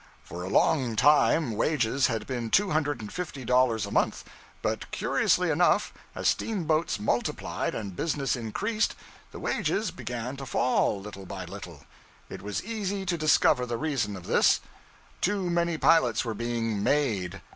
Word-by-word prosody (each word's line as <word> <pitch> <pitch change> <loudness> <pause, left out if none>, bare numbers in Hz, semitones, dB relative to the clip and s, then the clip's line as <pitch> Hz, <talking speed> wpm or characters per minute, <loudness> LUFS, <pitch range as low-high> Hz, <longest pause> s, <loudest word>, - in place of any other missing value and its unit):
For 90 - -8
a 95 - -4
long 130 -1 +2
time 150 +2 +4
wages 130 +2 +1
had 110 -2 -2
been 120 -3 -3
two 200 - +3
hundred 145 -5 0
and 105 - -8
fifty 155 -8 -5
dollars 125 -4 +3
a 100 - -8
month; - - +1 0.4
but - - -2
curiously - - +1
enough, - - +2 0.2
as - - -1
steamboats 165 -6 0
multiplied 115 +3 -1
and 100 -4 -5
business 145 - -1
increased, 205 - -1 0.4
the - - -9
wages 215 +2 -1
began 125 +2 -5
to 135 -1 -7
fall 120 -5 +1
little 100 -1 -9
by 95 -1 -6
little. 90 -5 -9 0.5
It - - -7
was 105 0 -4
easy 205 -3 -3
to 175 -1 0
discover 150 -5 +3
the 120 -1 -2
reason 130 -10 -1
of 90 - -9
this. - - +4 0.6
Too 190 -2 0
many 170 -1 +1
pilots 130 -8 +3
were 115 - -2
being 115 -2 -2
'made.' 100 -9 0
125 Hz, 155 wpm, -27 LUFS, 105-160 Hz, 0.6 s, time